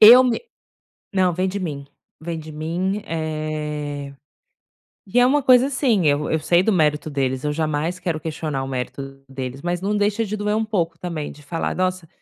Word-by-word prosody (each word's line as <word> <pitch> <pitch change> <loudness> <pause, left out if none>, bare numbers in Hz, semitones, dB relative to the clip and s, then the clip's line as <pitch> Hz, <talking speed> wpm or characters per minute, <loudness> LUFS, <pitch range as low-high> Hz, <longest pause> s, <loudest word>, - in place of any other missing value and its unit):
Eu 235 +4 +11
me 245 -2 +1 0.7
não 185 -2 +3
vem 185 +2 0
de 200 - -3
mim, 145 -7 -4 0.3
vem 165 0 -4
de 155 0 -9
mim, 175 +7 -2
eh, 150 -3 -3 0.9
e 235 +6 +1
é 245 - +7
uma 290 +2 +3
coisa 255 0 +6
assim, 255 - +2
eu 145 +1 +2
eu 160 - +2
sei 175 +3 +4
do 220 - +2
mérito 155 -3 +2
deles, 130 -1 -1
eu 150 - +1
jamais 155 +3 -1
quero 165 -4 -2
questionar 155 -3 -3
o 135 - -4
mérito 135 +1 -5
deles, 135 0 -5
mas 175 0 -1
não 205 +2 0
deixa 205 +2 +1
de 215 +1 -3
doer 210 +1 0
um 225 - +1
pouco 170 -7 -1
também 165 -4 -4
de 145 - -15
falar 165 +3 -2
nossa, 185 -2 -1
165 Hz, 190 wpm, -22 LUFS, 150-195 Hz, 0.9 s, Eu